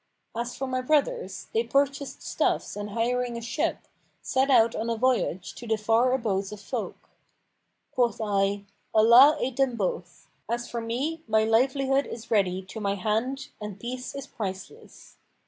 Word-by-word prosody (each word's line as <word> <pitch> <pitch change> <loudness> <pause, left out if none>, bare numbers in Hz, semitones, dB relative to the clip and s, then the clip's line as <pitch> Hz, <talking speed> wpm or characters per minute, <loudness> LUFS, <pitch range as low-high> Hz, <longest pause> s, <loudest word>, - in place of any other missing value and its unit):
As 235 +1 -3
for 270 - -2
my 255 -1 -1
brothers, 310 - 0
they 455 +1 +2
purchased 280 - 0
stuffs - - 0
and 205 0 -5
hiring 240 +2 -1
a - - -5
ship, 235 +6 -1 0.4
set 265 +1 +1
out 235 -3 +5
on 225 +2 -2
a 230 - -1
voyage 235 -7 0
to 240 - -10
the 220 0 +1
far 225 +4 +3
abodes 205 -6 -1
of 210 - -8
folk. 200 - -6 0.8
Quoth 240 -2 +1
I, 200 -2 0 0.3
'Allah 240 +8 +8
aid 250 -1 -2
them 270 -3 +2
both! 180 -4 -4 0.2
As 240 +1 -2
for 235 - -4
me, 270 +8 -2
my 220 0 +3
livelihood 270 +4 +2
is 230 0 -9
ready 190 -3 +2
to 190 +4 -8
my 200 -1 0
hand 225 +7 -1
and 210 -2 -6
peace 250 +3 -6
is 275 -1 -5
priceless.' 190 -8 -8
235 Hz, 165 wpm, -27 LUFS, 210-265 Hz, 0.8 s, Allah